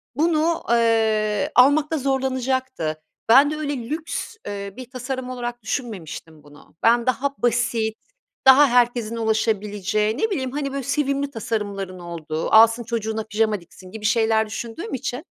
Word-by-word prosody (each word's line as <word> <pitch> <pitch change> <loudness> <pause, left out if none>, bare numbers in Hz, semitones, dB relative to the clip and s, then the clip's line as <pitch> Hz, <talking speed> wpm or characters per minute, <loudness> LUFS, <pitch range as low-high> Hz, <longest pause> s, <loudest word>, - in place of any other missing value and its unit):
bunu, 325 +2 +1
eee, 220 -2 +2
almakta 290 +5 +4
zorlanacaktı. 260 - -1 0.3
Ben 275 +5 +7
de - - -2
öyle 285 -6 -4
lüks, 320 +8 -4
eee, 200 -1 -5
bir 255 -2 -9
tasarım 255 0 -5
olarak 240 -1 -5
düşünmemiştim 175 - -6
bunu. 145 +1 -18
Ben, 235 +1 +4
daha 265 +2 0
basit, 235 -2 0 0.5
daha 280 +2 +8
herkesin 240 -2 +2
ulaşabileceği, 215 -1 0
ne 445 - 0
bileyim, 265 -10 -2
hani, 275 0 -3
böyle 275 -1 -4
sevimli 280 0 -1
tasarımların 200 -5 -4
olduğu, 165 -2 -5
alsın, 225 +2 +6
çocuğuna 220 -1 -3
pijama 215 -2 0
diksin 185 +2 -15
gibi 215 0 -7
şeyler 220 0 +3
düşündüğüm 235 - -6
için, 255 -1 -3
235 Hz, 135 wpm, -22 LUFS, 215-265 Hz, 0.5 s, daha